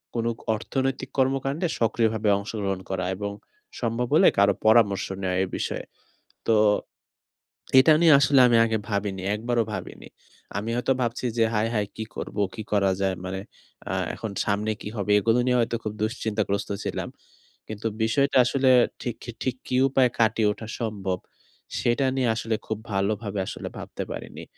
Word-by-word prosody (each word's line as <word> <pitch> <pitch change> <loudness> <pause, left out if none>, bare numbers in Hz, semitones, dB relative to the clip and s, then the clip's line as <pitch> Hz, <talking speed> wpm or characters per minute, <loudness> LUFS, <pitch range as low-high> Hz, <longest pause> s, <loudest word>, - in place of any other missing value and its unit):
কোন 115 -1 -1 0.3
অর্থনৈতিক 135 +4 -2
কর্মকাণ্ডে 135 +5 +1
সক্রিয়ভাবে 110 -1 +1
অংশগ্রহণ 100 -2 -3
করা 90 -1 -2
এবং 100 +1 -4 0.5
সম্ভব 120 +1 -1
হলে 185 - +7
কারো 100 0 +5
পরামর্শ 110 -3 +4 0.2
নেওয়া 90 -1 0
এ - - 0
বিষয়ে। - - -3 0.6
তো 115 - +4 1.2
এটা 155 +4 +7
নিয়ে 165 -2 +7
আসলে 140 0 +4
আমি 120 - +4
আগে 110 -1 0
ভাবিনি। 100 -2 -2
একবারও 120 +1 0
ভাবিনি। 95 - -7 0.5
আমি 105 +3 -3
হয়তো 125 +2 +1
ভাবছি 120 +1 -2
যে 115 - +4
হায়, 110 +1 +1
হায় 105 -2 0
কি 110 - -4
করব, - - -6 0.2
কি 110 - -5
করা 100 -2 +3
যায়? 95 -1 +1
মানে 95 +1 -4 0.5
আ - - -1 0.2
এখন 110 - -5
সামনে 105 +1 0
কি - - -5
হবে? 105 0 -1
এগুলো 115 +4 +2
নিয়ে 125 - +3
হয়তো 115 - -1
খুব 105 - -3
দুশ্চিন্তাগ্রস্ত 110 -2 -1 0.2
ছিলাম। - - -3 0.6
কিন্তু 110 +1 -4 0.2
বিষয়টা 135 +5 +2
আসলে 130 +2 +2 0.3
ঠিক 120 -2 -3
কি 120 - -6
ঠিক 130 -2 -1
কী 125 - -1
উপায়ে 130 -2 +3
কাটিয়ে 110 -1 +3
ওঠা 110 - -9
সম্ভব? 100 -5 -2 0.6
সেটা 120 +3 +1
নিয়ে 130 -3 +1
আসলে 115 0 -1
খুব 110 - -2 0.2
ভালোভাবে 100 +1 -1
আসলে - - -6
ভাবতে - - -6
পারিনি। - - -7
110 Hz, 160 wpm, -25 LUFS, 100-120 Hz, 1.2 s, হলে